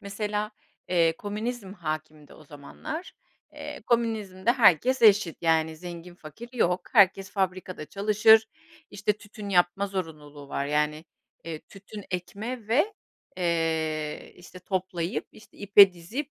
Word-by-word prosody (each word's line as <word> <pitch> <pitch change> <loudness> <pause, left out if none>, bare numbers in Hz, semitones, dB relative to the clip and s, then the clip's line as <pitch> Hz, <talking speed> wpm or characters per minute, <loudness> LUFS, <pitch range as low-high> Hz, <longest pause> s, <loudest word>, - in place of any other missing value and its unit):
Mesela, 210 +1 -3 0.4
eee, 165 -2 +3
komünizm 210 +1 -5
hâkimdi 155 -4 -6
o - - -16
zamanlar. 230 - -8 0.4
Eee, - - -8
komünizmde 220 -4 +1
herkes 245 - +4
eşit, 205 -6 +5
yani, 160 -1 +2
zengin 175 +1 -9
fakir 175 +8 -11
yok. 180 -7 +1
Herkes 195 -3 +4
fabrikada 185 -3 -3
çalışır 215 +3 +4 0.4
işte 205 +1 0
tütün 210 0 -10
yapma 180 +1 +2
zorunluluğu 150 -7 -7
var. 140 0 -2
Yani, 150 +2 0 0.4
eee, 165 -2 -5
tütün 200 +1 -11
ekme 210 +6 -5
ve, 300 - +2 0.4
eee, 160 -3 -1
işte 180 +1 -13
toplayıp 185 +1 -3
işte 215 - -18
ipe 200 -1 +7
dizip, 225 - -6
190 Hz, 120 wpm, -27 LUFS, 165-210 Hz, 0.4 s, ipe